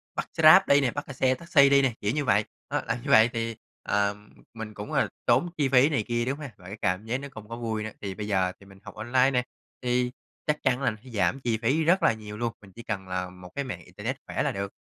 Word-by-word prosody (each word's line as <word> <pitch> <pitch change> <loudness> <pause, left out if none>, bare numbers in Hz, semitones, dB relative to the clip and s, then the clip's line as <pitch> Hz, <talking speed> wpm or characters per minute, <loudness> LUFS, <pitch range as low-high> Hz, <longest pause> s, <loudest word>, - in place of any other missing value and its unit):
bắt - - -3
xe - - -2
Grab 155 +5 +10
đi 140 0 +5
nè, 130 -3 +1
bắt, 145 - -5
ơ, 135 - -7
xe 130 0 +2
taxi 140 -1 +4
đi 140 0 +6
nè, 135 -3 +1
kiểu 105 - +1
như 150 -1 -1
vậy, 105 -2 +3 0.3
đó, - - 0
là - - 0
như - - -2
vậy 110 +2 +7
thì, 115 -1 -2 0.3
ờm, 105 0 -1 0.2
mình 110 -2 -7
cũng, 105 0 -7
gọi - - +3
là, - - -1 0.2
tốn 130 +9 +3
chi 145 -3 +2
phí 130 +2 +5
này 135 -8 0
kia, 120 0 0
đúng 135 +3 -2
ha? 145 -4 -7
Và 90 - -14
cái 100 +4 -7
cảm 95 +1 0
giác 115 +3 -1
nó 140 - -7
không 110 -3 -11
có 115 - -5
vui 110 -2 -3
nữa, 110 - -5
thì 100 -2 -5
bây 105 0 -5
giờ 95 -3 +1
thì 100 - -16
mình 95 0 -16
học - - -11
online 125 +3 +2
nè, 125 -2 +1 0.4
thì 125 0 +1 0.4
chắc 150 0 0
chắn 130 0 +2
là 125 -3 +2
sẽ 130 - -13
giảm 115 +4 0
chi 120 -4 0
phí 135 +8 +1
rất 180 +4 +3
là - - +5
nhiều 105 -1 -9
luôn, 120 0 -2
mình 100 -2 -15
chỉ 120 - -10
cần 100 -5 -4
là 90 0 -3
một 90 0 -12
cái 140 - -1
mạng 90 - -7
internet - - -5
khỏe - - -1
là - - +1
được. 100 0 -4
115 Hz, 285 wpm, -27 LUFS, 105-135 Hz, 0.4 s, Grab